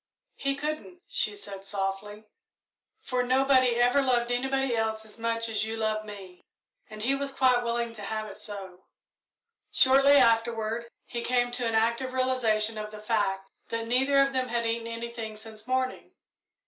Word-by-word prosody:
"He 275 0 -1
couldn't," 310 +5 -5
she - - +1
said 195 - -9
softly, 195 +1 -4 0.8
"for 250 -1 0
nobody 255 -1 +3
ever 245 +3 +4
loved 245 -2 +1
anybody 265 0 0
else 220 -1 -1
as 220 +1 -12
much 230 0 -1
as 220 -2 -1
you 220 +1 -4
love 215 -1 -1
me"; 195 -4 -10 0.5
and 215 0 -8
he 265 +4 +2
was 275 0 -2
quite 255 -2 +3
willing 235 0 -1
to 215 - -10
have 215 +2 -3
it 200 - -9
so. 190 -3 -9 0.9
Shortly 275 +2 +6
afterward 230 -1 +2 0.2
he 235 - -5
came 245 0 +1
to 245 -1 -1
an 225 - -1
active 235 +3 +1
realisation 225 -4 +2
of 210 0 -5
the 215 0 -10
fact 195 -3 -1 0.2
that 230 0 -3
neither 265 +4 +2
of 275 0 +3
them 255 -1 0
had 235 -1 -1
eaten 230 0 -1
anything 230 -1 -6
since 215 0 -11
morning. 255 0 -2
230 Hz, 165 wpm, -28 LUFS, 215-255 Hz, 0.9 s, Shortly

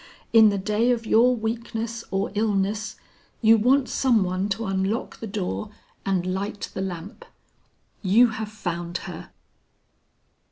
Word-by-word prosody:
"In 220 -2 +8
the 200 - 0
day 210 +5 +1
of 235 -2 +1
your 240 +3 +4
weakness 230 0 -4
or 195 +1 -1
illness 210 0 0 0.4
you 225 -1 +6
want 255 +4 +3
some 240 -6 +2
one 185 +2 -1
to 220 +3 -2
unlock 195 +4 -2
the 225 - -5
door 200 +1 -3 0.4
and 185 -2 +1
light 195 +3 -3
the - - -3
lamp. 190 +2 -6 0.8
You 220 +5 +5
have 220 -1 -5
found 175 -4 -4
her!" - - -8
210 Hz, 135 wpm, -24 LUFS, 195-225 Hz, 0.8 s, In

